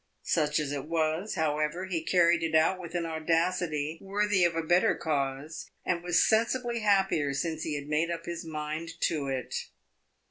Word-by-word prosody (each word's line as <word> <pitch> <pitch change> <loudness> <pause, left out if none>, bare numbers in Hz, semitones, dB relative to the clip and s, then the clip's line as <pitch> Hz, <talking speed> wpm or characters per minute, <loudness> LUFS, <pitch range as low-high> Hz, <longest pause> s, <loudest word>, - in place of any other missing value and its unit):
Such 150 -2 +1
as 145 -2 -2
it 140 -2 -3
was, 160 +4 0
however, 155 +2 0
he 180 -3 -2
carried 175 -1 +4
it 165 -1 -1
out 165 +4 +4
with 175 -1 -8
an 170 -1 0
audacity 165 -1 0
worthy 200 -1 +1
of 170 -1 +2
a 165 - -1
better 175 +3 +3
cause, 140 0 -3 0.2
and 175 -1 0
was 175 -1 +3
sensibly 235 +2 +1
happier 195 -9 +2
since 160 +2 -2
he 155 -2 -2
had 145 -1 -4
made 155 +3 +1
up 170 -1 -4
his 170 0 -5
mind 160 +1 -5
to 150 -4 0
it. 130 -2 -3
165 Hz, 175 wpm, -29 LUFS, 150-180 Hz, 0.2 s, carried